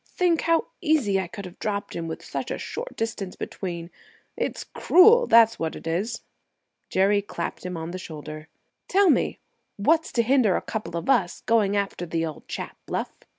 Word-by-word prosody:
Think 350 Hz, -3 st, +1 dB
how 330 Hz, 0 st, +2 dB, 0.2 s
easy 290 Hz, -, +2 dB
I 190 Hz, -, -2 dB
could 200 Hz, +3 st, -8 dB
have 180 Hz, -, -11 dB
dropped 205 Hz, -1 st, -3 dB
him, 165 Hz, -1 st, -3 dB
with 160 Hz, -, -6 dB
such -, -, -4 dB
a -, -, -2 dB
short -, -, -6 dB
distance 215 Hz, -4 st, -3 dB
between. 170 Hz, -2 st, -5 dB, 0.4 s
It's -, -, -3 dB
cruel, 450 Hz, +7 st, +5 dB
that's 230 Hz, 0 st, +6 dB
what 160 Hz, -1 st, -2 dB
it -, -, -10 dB
is!" 195 Hz, +9 st, -2 dB, 0.7 s
Jerry 200 Hz, +2 st, +3 dB
clapped 200 Hz, -, -5 dB
him 180 Hz, -1 st, -4 dB
on 165 Hz, +1 st, -5 dB
the 185 Hz, -, -5 dB
shoulder. 155 Hz, -2 st, -8 dB, 0.4 s
"Tell 390 Hz, -2 st, +5 dB
me -, -, +1 dB, 0.4 s
what's 320 Hz, +11 st, +2 dB
to 235 Hz, -, +3 dB
hinder 245 Hz, -5 st, +3 dB
a -, -, 0 dB
couple 175 Hz, -6 st, -4 dB
of 170 Hz, -, -5 dB
us 185 Hz, -10 st, +2 dB
going 205 Hz, -3 st, +2 dB
after 195 Hz, -3 st, -2 dB
the 165 Hz, 0 st, -1 dB
old 155 Hz, -2 st, -8 dB
chap, -, -, -6 dB
Bluff?" -, -, -3 dB
200 Hz, 185 wpm, -25 LUFS, 170-255 Hz, 0.7 s, that's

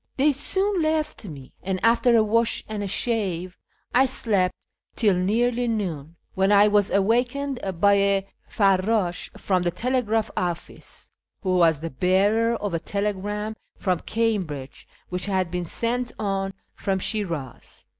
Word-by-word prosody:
They 290 Hz, +3 st, +4 dB
soon 380 Hz, +7 st, +1 dB
left 310 Hz, -6 st, -1 dB
me, 140 Hz, -8 st, -10 dB
and, 190 Hz, 0 st, -2 dB
after 235 Hz, +1 st, +4 dB
a 225 Hz, -, +5 dB
wash 230 Hz, +2 st, +1 dB
and 215 Hz, -1 st, -4 dB
a 200 Hz, -, -2 dB
shave, 185 Hz, -5 st, -2 dB, 0.4 s
I 265 Hz, +2 st, +5 dB
slept 200 Hz, -7 st, +1 dB, 0.4 s
till 210 Hz, -4 st, +3 dB
nearly 235 Hz, +7 st, +1 dB
noon, 170 Hz, -9 st, -3 dB, 0.2 s
when 190 Hz, +1 st, +2 dB
I 205 Hz, 0 st, +6 dB
was 205 Hz, -1 st, +3 dB
awakened 245 Hz, +6 st, +1 dB, 0.2 s
by 200 Hz, +2 st, +5 dB
a/«?Tds/t 195 Hz, -1 st, 0 dB
from 185 Hz, -2 st, +1 dB
the 175 Hz, -, +1 dB
telegraph 225 Hz, +2 st, 0 dB
office, 175 Hz, -2 st, -5 dB, 0.3 s
who 185 Hz, -1 st, +1 dB
was 165 Hz, -4 st, +4 dB
the 165 Hz, -, -4 dB
bearer 200 Hz, -, +2 dB
of 205 Hz, -4 st, -3 dB
a 165 Hz, -, 0 dB
telegram 205 Hz, +3 st, -3 dB, 0.2 s
from 185 Hz, -4 st, 0 dB
Cambridge, 185 Hz, -12 st, -2 dB, 0.2 s
which 180 Hz, +1 st, -3 dB
had 185 Hz, -3 st, 0 dB
been 180 Hz, -1 st, -2 dB
sent 240 Hz, +6 st, -2 dB
on 195 Hz, -2 st, -2 dB, 0.2 s
from 195 Hz, -1 st, -1 dB
Shiraz. 170 Hz, -, -4 dB
200 Hz, 140 wpm, -24 LUFS, 185-230 Hz, 0.4 s, I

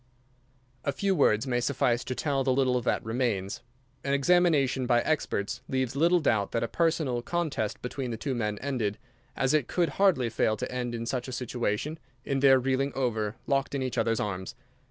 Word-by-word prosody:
A 140 Hz, -, 0 dB
few 195 Hz, +6 st, 0 dB
words 110 Hz, -, +3 dB
may 125 Hz, -2 st, 0 dB
suffice 120 Hz, -1 st, +1 dB
to 130 Hz, -, -3 dB
tell 140 Hz, -1 st, 0 dB
the 130 Hz, -, +2 dB
little 130 Hz, -1 st, +2 dB
that -, -, -1 dB
remains. 110 Hz, -5 st, -1 dB, 0.4 s
An 140 Hz, 0 st, +1 dB
examination 140 Hz, -4 st, +3 dB
by 120 Hz, -1 st, +4 dB
experts 140 Hz, -9 st, -1 dB
leaves 130 Hz, -1 st, -1 dB
little 170 Hz, +5 st, +4 dB
doubt 110 Hz, -10 st, +1 dB
that 115 Hz, -, 0 dB
a -, -, 0 dB
personal 155 Hz, -4 st, 0 dB
contest 145 Hz, -7 st, -2 dB
between 125 Hz, +1 st, -4 dB
the 115 Hz, -, -3 dB
two 135 Hz, +4 st, -2 dB
men 105 Hz, -4 st, -2 dB
ended, 120 Hz, -7 st, -1 dB, 0.4 s
as 135 Hz, +1 st, +1 dB
it 150 Hz, -5 st, +2 dB
could 175 Hz, -2 st, +1 dB
hardly 170 Hz, -, +2 dB
fail 110 Hz, -1 st, +1 dB
to -, -, -4 dB
end 125 Hz, -1 st, -3 dB
in 115 Hz, 0 st, -4 dB
such 125 Hz, +1 st, -2 dB
a -, -, -5 dB
situation, 125 Hz, +4 st, -2 dB, 0.3 s
in 135 Hz, -1 st, 0 dB
their 135 Hz, -1 st, +6 dB
reeling 135 Hz, +2 st, 0 dB
over, 110 Hz, -5 st, -1 dB
locked 140 Hz, 0 st, 0 dB
in 135 Hz, -, -1 dB
each 130 Hz, -2 st, -2 dB
other's 115 Hz, 0 st, +1 dB
arms. 95 Hz, -3 st, -4 dB
130 Hz, 190 wpm, -28 LUFS, 115-140 Hz, 0.4 s, their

